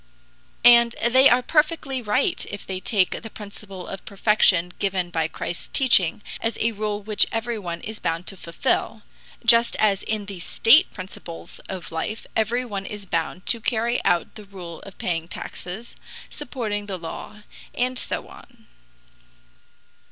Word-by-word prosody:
And 235 -1 +7
they 260 +3 +7
are 250 +1 +4
perfectly 300 -4 +1
right 255 - +1
if 205 - -7
they 190 -1 -4
take 190 -2 0
the 225 - -8
principle 200 -3 -9
of 195 - -7
perfection 195 -4 +3
given 185 -3 -1
by 160 -2 0
Christ's 170 +1 -5
teaching 205 -9 +4 0.2
as 225 - -1
a 230 - +2
rule 210 -1 -3
which 215 0 +5
everyone 220 -7 -3
is 220 0 -7
bound 165 +2 -2
to 195 - -5
fulfill, 170 -2 -2 0.4
just 230 0 +6
as 205 -3 +2
in 215 -1 -2
the 195 -2 -7
state 255 - +5
principles 185 -3 -9
of 185 -3 -6
life 165 +7 -4
everyone 220 -3 -1
is 205 -1 -7
bound 170 0 -2
to 235 - +1
carry 235 +1 0
out 175 -1 +1
the 215 - -10
rule 180 -4 -9
of 195 - -12
paying 165 -2 -2
taxes, 190 +6 -7 0.4
supporting 225 -8 -4
the 195 -2 -4
law, 190 +5 -8 0.3
and 250 0 0
so - - -3
on. 235 -3 -16
210 Hz, 150 wpm, -24 LUFS, 185-235 Hz, 0.4 s, And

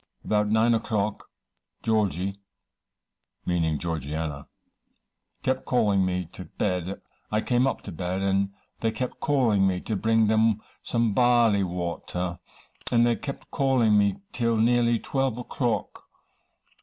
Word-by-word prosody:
About 105 -1 +2
nine 110 +2 +4
o'clock, 105 -2 -1 0.5
Georgy 100 -3 0 1.1
(meaning 80 -3 +1
Georgianna) 75 -2 -4 1.0
kept 130 0 0
calling 105 -6 +2
me 90 -1 -1
to - - -9
bed. 90 -1 -2 0.3
I 110 0 +1
came 125 +2 +2
up - - -2
to 100 - -8
bed, 90 +3 -3
and 100 0 +1 0.3
they 115 - +1
kept 115 +3 -4
calling 115 -10 +3
me 90 -1 0
to 110 - -2
bring 110 +2 +3
them 110 0 +3 0.2
some 115 -3 0
barley 120 -4 +4
water, 90 0 -3 0.5
and 120 -1 +5
they 120 -1 +3
kept 140 +3 -7
calling 130 -7 +3
me 100 -1 +3 0.2
till 115 -2 +1
nearly 120 +1 +3
12 135 -2 -1
o'clock. 125 -1 -2
110 Hz, 130 wpm, -26 LUFS, 95-120 Hz, 1.1 s, and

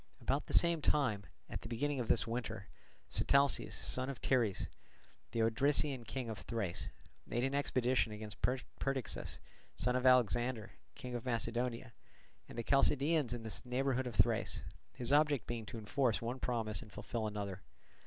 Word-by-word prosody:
About - - 0
the - - -5
same 170 -2 +5
time, 110 -10 +1 0.2
at - - -5
the 115 - -8
beginning 140 +4 -1
of 120 - -2
this - - +3
winter, 115 -3 -4 0.4
Sitalces, 140 0 +3
son 130 +1 0
of 135 - -5
Teres, 115 -7 +2 0.6
the 115 - +1
Odrysian 135 +2 +2
king 130 -3 -3
of 110 -2 -5
Thrace, 100 -7 -3 0.4
made 120 - -1
an 135 +1 0
expedition 130 -4 +2
against 105 -1 -6
Perdiccas, 130 0 -2 0.4
son 125 0 0
of 130 0 +3
Alexander, 120 -2 +3 0.2
king 125 -1 -7
of 120 -2 -3
Macedonia, 120 0 -1 0.6
and - - -9
the 115 - -1
Chalcidians 140 +1 +3
in 115 - -7
the 110 - -3
neighbourhood 130 0 0
of 120 - -5
Thrace; 95 - +2 0.3
his 125 +2 0
object 145 -5 +4
being 115 -2 -4
to 115 - -6
enforce 115 +2 +1
one 120 +3 -3
promise 115 -4 0
and 105 -4 -12
fulfil 110 +2 -3
another. 100 -3 -4
120 Hz, 160 wpm, -36 LUFS, 115-135 Hz, 0.6 s, same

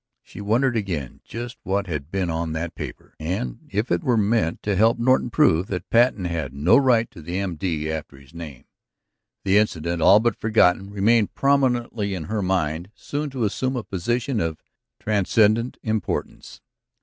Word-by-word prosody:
She - - -10
wondered 120 +5 +1
again 90 - -3
just 120 +2 -7
what 100 +1 -1
had 75 -5 -5
been 95 -2 -1
on 80 -1 -2
that 80 +1 -3
paper, - - -8
and 80 -7 -3
if 105 +5 -2
it 85 -1 +1
were 120 -3 +2
meant 105 -5 +1
to 100 -1 0
help 110 +5 +4
Norton 125 +1 +2
prove 105 - +3
that 90 -2 -5
Patten 115 -5 +3
had 80 -7 -3
no 85 +11 +4
right 125 -4 +4
to 85 - -12
the 85 +4 -4
M.D. 85 -4 -2
after 75 -3 -6
his 70 +3 -18
name? 80 -6 -9 0.8
The 100 +1 +5
incident, 85 -5 -1
all 100 +6 +7
but 120 +1 +1
forgotten, 100 -3 +3
remained 105 +2 +2
prominently 120 -7 +1
in 85 - -4
her 105 +7 -2
mind, 90 -2 -1
soon 145 +1 -4
to 130 -3 -3
assume 130 +5 -1
a 120 - -3
position 120 +6 -1
of 80 -3 -3 0.4
transcendent 110 +3 +2
importance. 110 -1 -3
100 Hz, 170 wpm, -23 LUFS, 85-115 Hz, 0.8 s, all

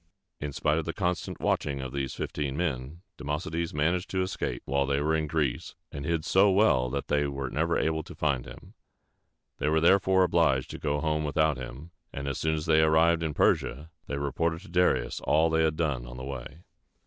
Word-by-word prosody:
In 75 -1 -4
spite 75 +3 +1
of 80 - -4
the 85 - -3
constant 90 -3 -2
watching 70 -2 0
of 65 -1 -5
these 70 -2 -3
fifteen 70 -2 -3
men, 80 0 -3 0.2
Democedes 75 +3 -3
managed 85 +5 0
to 95 -1 0
escape 90 -9 -3
while 70 +1 0
they 70 0 +1
were 75 +2 +1
in 80 -1 -1
Greece, 75 +1 -2 0.2
and 70 -2 -6
hid 85 -1 -1
so 95 +4 +5
well 95 -11 +3
that 70 +2 -3
they 75 0 +1
were 70 -2 -4
never 85 +2 +1
able 80 0 0
to - - -11
find 70 -5 -1
him. - - -12 0.9
They 75 - +1
were 80 +1 +3
therefore 95 +2 +4
obliged 80 -7 +2
to - - -7
go 75 -1 -1
home 75 -1 0
without 75 -1 +1
him; 65 +6 -8 0.2
and 70 0 -5
as 70 - -2
soon 80 0 +1
as 75 0 -4
they 80 -1 +4
arrived 80 +1 +4
in 80 -2 -2
Persia, 75 +6 +1 0.2
they 70 - -3
reported 80 +4 -1
to 100 - -14
Darius 85 -8 +1
all 80 +2 +2
they 80 0 +3
had 80 -1 +1
done 70 -7 -1
on 60 +1 -9
the 65 - -6
way. 70 +5 -8
75 Hz, 205 wpm, -28 LUFS, 70-85 Hz, 0.9 s, so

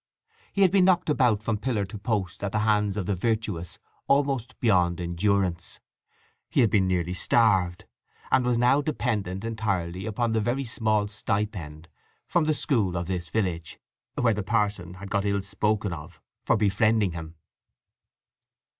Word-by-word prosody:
He 200 - +2
had 185 - +5
been 190 -2 +4
knocked 180 -4 +3
about 120 -7 +2
from 110 -2 -1
pillar 110 -4 -1
to 100 +3 -8
post 100 -4 -2
at 100 - -1
the 105 - +1
hands 105 -2 +1
of 100 - -2
the 100 - 0
virtuous 105 -4 -2 0.3
almost 135 -3 0
beyond 90 -6 +2
endurance; 90 0 -1 0.7
he - - +2
had 115 -5 +3
been 95 -3 +3
nearly 90 -1 0
starved, 95 -3 +2 0.5
and 130 - +4
was 125 -1 +1
now 125 +4 +4
dependent 110 - -2
entirely 100 -4 -2
upon 115 +2 -1
the 110 0 +1
very 125 +5 -1
small 110 -3 0
stipend 100 -7 -3 0.4
from 170 -3 +1
the 155 0 +1
school 105 - +3
of 85 - -2
this 90 -2 -4
village 85 -4 -2 0.4
(where 115 -2 +2
the 105 - -2
parson 100 -4 -1
had 100 +1 -10
got 100 - +1
ill 100 -1 0
spoken 105 0 -1
of 80 +1 -10 0.3
for - - +3
befriending 105 0 +2
him). 80 -1 -8
105 Hz, 160 wpm, -26 LUFS, 90-115 Hz, 0.7 s, had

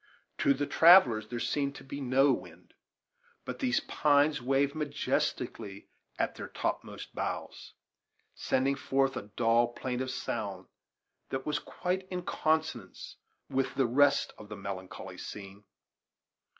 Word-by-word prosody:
To 140 - +4
the 145 +2 -1
travellers 140 - +6
there 120 - -5
seemed 140 +2 -1
to - - -10
be 140 +1 -7
no 135 +1 +4
wind; - - -9 0.7
but - - -5
these 260 +3 +1
pines 150 - +2
waved 135 +3 +2
majestically 140 -8 -2 0.3
at - - 0
their - - -7
topmost - - -4
boughs, - - -5 0.6
sending 135 +2 +1
forth 135 -1 +1
a 105 - -6
dull, 115 0 +4
plaintive 125 +1 -3
sound 130 - -4 0.6
that 135 0 -3
was 150 - 0
quite 185 +1 -3
in 180 -1 -4
consonance 160 0 -2 0.3
with 135 -1 -1
the 135 - +3
rest 140 +4 +3
of 105 - -11
the 105 - -7
melancholy 95 -1 -7
scene. 100 0 -9
135 Hz, 130 wpm, -30 LUFS, 120-145 Hz, 0.7 s, travellers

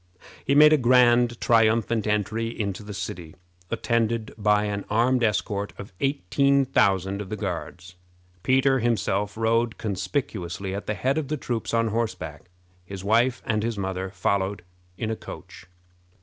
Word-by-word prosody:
He 140 - +1
made 150 +1 +8
a - - +6
grand 120 -1 +4
triumphant 115 -1 +2
entry 105 +2 0
into 105 -4 -4
the 105 0 -9
city, 85 -5 -6 0.3
attended 115 0 -1
by 105 -1 +2
an 100 -1 -3
armed 120 +3 +2
escort 100 -1 -1
of 100 -1 -10
eighteen 140 0 +2
thousand 95 -5 +1
of 100 - -8
the 110 - -3
Guards. 90 -2 -5 0.5
Peter 135 +2 +3
himself 105 -3 0
rode 115 +1 +1
conspicuously 100 - -3
at 100 - -5
the 105 - -1
head 130 - 0
of 150 - -4
the 155 +2 -2
troops 120 -5 -3
on 115 -1 +1
horseback. 95 -9 -4 0.3
His 95 +1 -8
wife 115 +5 +2
and 110 -2 0
his 115 0 -2
mother 95 -1 -3
followed 95 0 -1 0.3
in 110 -1 -2
a - - -1
coach. 85 - -11
110 Hz, 150 wpm, -25 LUFS, 100-120 Hz, 0.5 s, made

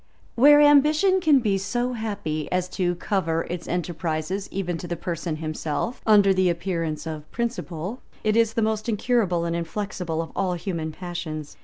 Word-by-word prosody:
Where 290 +4 +7
ambition 300 +6 +5
can 300 -6 +5
be 200 -4 +1
so 240 +6 -1
happy 205 -9 -3
as 180 0 0
to 180 -2 -1
cover 165 -3 -1
its 175 -1 -5
enterprises, 175 +2 -2
even 180 -3 -2
to 175 - -6
the 175 - -2
person 170 -1 -3
himself, 155 +8 -3
under 205 -2 +6
the 185 -1 +3
appearance 170 -3 -2
of 155 -2 -6
principle, 230 -3 -4 0.2
it 215 0 +2
is 225 -1 +3
the 225 - +1
most 220 +1 -1
incurable 210 -6 +1
and 170 0 -1
inflexible 170 -1 -3
of 165 - -10
all 185 -2 0
human 165 -3 -3
passions. 155 -3 -6
185 Hz, 165 wpm, -24 LUFS, 165-220 Hz, 0.2 s, Where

